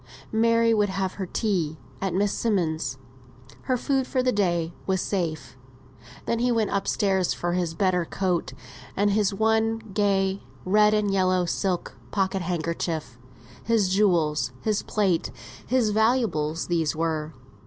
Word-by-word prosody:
Mary 230 +1 +3
would 210 -2 +2
have 190 0 -2
her 190 - -2
tea 175 -8 -1 0.2
at 195 - -1
Miss 200 +1 +2
Simmonds'; 160 - -1 0.7
her 255 -1 +1
food 265 0 0
for 255 -2 0
the 255 - +2
day 175 -6 0
was 190 -1 +1
safe. 160 -9 -3 0.7
Then 230 - 0
he 245 +1 +2
went 225 -3 +1
up 200 - -1
stairs 190 -3 +1
for 175 0 -2
his 175 -2 -1
better 185 -1 +2
coat, 180 0 -1 0.4
and 205 +1 +3
his 205 0 +2
one, 220 +2 +2 0.2
gay, 195 -1 +1 0.2
red 210 +3 +4
and 205 -2 +1
yellow 185 -1 +2
silk 180 +1 -2
pocket 195 -1 0
handkerchief 165 -5 -3 0.4
his 220 -5 +2
jewels, 165 - +2
his 215 -2 +1
plate, 195 -6 0 0.4
his 245 -4 +2
valuables, 215 -9 +1
these 165 -3 0
were. 155 -2 -2
195 Hz, 145 wpm, -25 LUFS, 170-215 Hz, 0.7 s, red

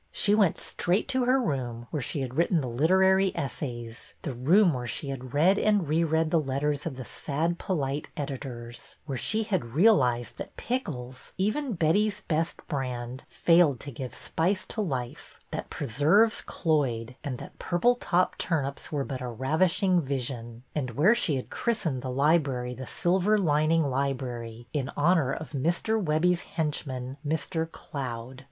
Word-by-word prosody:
She 205 - +3
went 205 -6 +4
straight 180 +4 0
to 260 -2 +1
her 255 +2 +4
own 250 - -1
room, 120 -4 -3
where 150 - -1
she 140 +3 -3
had 130 -2 -4
written 170 +2 +3
the 130 - -3
literary 190 +9 +4
essays," 120 -4 -5
— - - -39
the 140 - -3
room 165 - +4
where 125 -1 -4
she 140 +5 -4
had 130 -1 -6
read 185 +7 +4
and 205 -6 +2
reread 160 +1 +2
the 165 - +4
letters 145 +1 -1
of 145 - -4
the 130 -1 -7
sad, 165 +4 -2
polite 145 -5 -2
editors; 125 -5 -6
where 140 -3 -3
she 220 0 0
had 175 - -2
realized 125 - +3
that - - -7
pickles, 130 - -4
even 225 +7 0
Betty's 200 +5 +2
Best 165 +1 -2
Brand, 125 -3 -4
failed 165 -7 +4
to 140 - -6
give 130 0 -6
spice 185 +4 -1
to 220 - -2
life, 130 -10 -4
that - - -4
preserves 165 - +3
cloyed, 130 -7 -1
and 135 -5 -3
that - - -11
purple 180 +8 +3
top 185 -7 +1
tur 160 -5 +1
nips 140 0 -5
were 145 -3 -1
but 130 -2 -5
a 125 - -3
ravishing 165 - +2
vision; 125 -4 -4
and 140 -4 -2
where 175 - +5
she 180 -11 +1
had 130 - -5
christened 165 - -1
the 130 - -4
library 135 -3 +2
the 130 0 -8
Silver 190 +4 +2
lining 160 -2 +3
Library," 125 -4 -3
in 140 -3 -1
honor 155 -3 +3
of 155 +2 -5
Mr. 175 +10 0
Webbie's 170 +2 +2
henchman, 135 -5 -3
Mr. 160 +2 -2
Cloud. 125 -2 -6
150 Hz, 165 wpm, -28 LUFS, 130-175 Hz, -, where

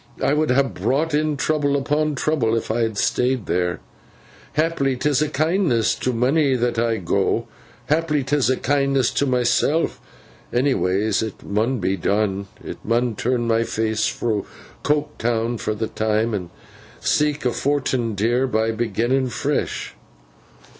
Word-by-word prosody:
It 145 - +1
would 155 0 +1
ha 130 +2 +4
brought'n 145 - 0
trouble 145 -1 +1
upon 150 +2 0
trouble 130 -6 +1
if 115 - -3
I 115 - 0
had 110 -2 -1
stayed 125 +1 +1
theer. 90 -1 0 0.7
Haply 155 -4 +1
'tis 145 +2 +1
a 155 - +1
kindness 155 - +1
to 130 - -2
monny 135 +4 +2
that 120 -1 0
I 115 -1 +1
go; 85 -4 0 0.4
haply 150 -2 +1
'tis 140 0 +1
a 130 - +2
kindness 140 -2 +1
to 140 - 0
myseln; 125 +5 +2 0.6
anyways 110 -6 +1
it 110 -3 -5
mun 110 +6 0
be 95 -1 -1
done. 100 +1 0 0.2
I - - -5
mun 120 +1 +1
turn 120 0 0
my 115 0 +2
face 110 -1 0
fro 110 -4 -2 0.3
Coketown 120 -6 -1
fur 110 - -2
th' 110 +1 -4
time, 110 +1 +1
and 90 -4 -3 0.5
seek 150 -2 +1
a 125 - +3
fort'n, 130 -5 0
dear, 120 +6 +1
by 110 -2 +1
beginnin 120 +4 0
fresh. - - -2
125 Hz, 145 wpm, -22 LUFS, 110-145 Hz, 0.7 s, ha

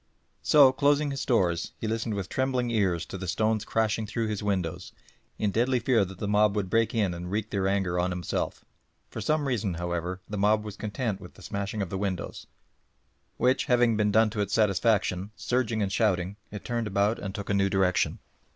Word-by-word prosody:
So, 140 -3 +6
closing 145 +2 +2
his 135 - -3
doors, 90 -8 +1
he 110 - -3
listened 110 0 -2
with 100 -2 -3
trembling 130 -1 0
ears 95 -7 +1
to 95 - -7
the 95 - -5
stones 110 +4 +1
crashing 110 -1 0
through 110 +1 -2
his 105 -2 -3
windows, 95 -5 -2 0.4
in 105 - 0
deadly 125 +5 +2
fear 120 -4 +3
that 95 0 -10
the 100 - -3
mob 105 0 +3
would 100 -3 -2
break 115 +1 +2
in 100 -5 +1
and 85 +1 -6
wreak 105 +2 -2
their 95 -2 0
anger 95 -3 0
on 90 +1 +1
himself. 90 -1 -3 0.5
For - - -5
some 150 +6 +1
reason, 105 -8 -1
however, 85 +1 -3
the 105 -1 -4
mob 105 +1 +3
were 105 - -5
content 105 0 -3
with 90 - -12
the 100 - -15
smashing 100 +1 -3
of 90 - -7
the 95 - -2
windows, 95 -3 -4 0.9
which 130 +2 +2
having 120 -4 +3
been 105 -1 +2
done 110 +1 +4
to 105 -1 -2
its 100 0 -1
satisfaction, 105 -3 +2
surging 120 -4 0
and 95 - -2
shouting 95 -3 +1
it 105 - -8
turned 120 -2 -2
about 100 +2 +1
and 95 -1 -5
took 100 0 -4
a - - +2
new 100 -1 +2
direction. 95 -2 +1
105 Hz, 205 wpm, -27 LUFS, 95-115 Hz, 0.9 s, So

